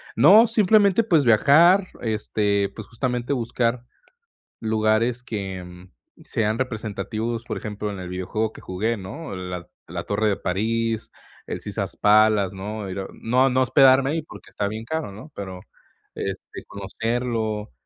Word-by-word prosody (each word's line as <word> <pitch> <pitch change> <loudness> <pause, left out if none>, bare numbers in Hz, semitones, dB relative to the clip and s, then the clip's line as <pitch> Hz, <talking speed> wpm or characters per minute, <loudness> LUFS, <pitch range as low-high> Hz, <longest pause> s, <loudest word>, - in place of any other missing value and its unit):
No, 195 - +7
simplemente, 215 -1 +4
pues, 165 - +3
viajar, 165 - +5 0.2
este, 105 -2 0
pues 110 -3 -9
justamente 125 +2 -2
buscar 120 -1 -1 0.8
lugares 110 +2 +1
que, 95 -5 -6 0.4
sean 110 0 -1
representativos. 115 -1 -3
Por - - -4
ejemplo, 105 -1 -5
en 100 - -6
el 90 -1 -6
videojuego 105 +5 -2
que - - -12
jugué, 110 +6 -2
¿no? 100 - -7
La 90 -1 -6 0.2
la - - -5
Torre 105 +1 0
de 100 - +1
París, 115 +4 -1 0.4
el - - -4
Caesar's - - -4
Palace, 105 -2 +4
¿no? 105 +1 -5
Era 95 +1 -4
no 130 +3 +2
no 130 +1 +2
hospedarme 135 +2 +5
ahí 165 - 0
porque 150 - -13
está 100 -1 -2
bien 110 +2 -6
caro, 160 -2 -3
¿no? 110 +10 -11
Pero, 95 -2 -7 0.5
este, - - -6
conocerlo, 110 - -3
110 Hz, 140 wpm, -23 LUFS, 100-125 Hz, 0.8 s, No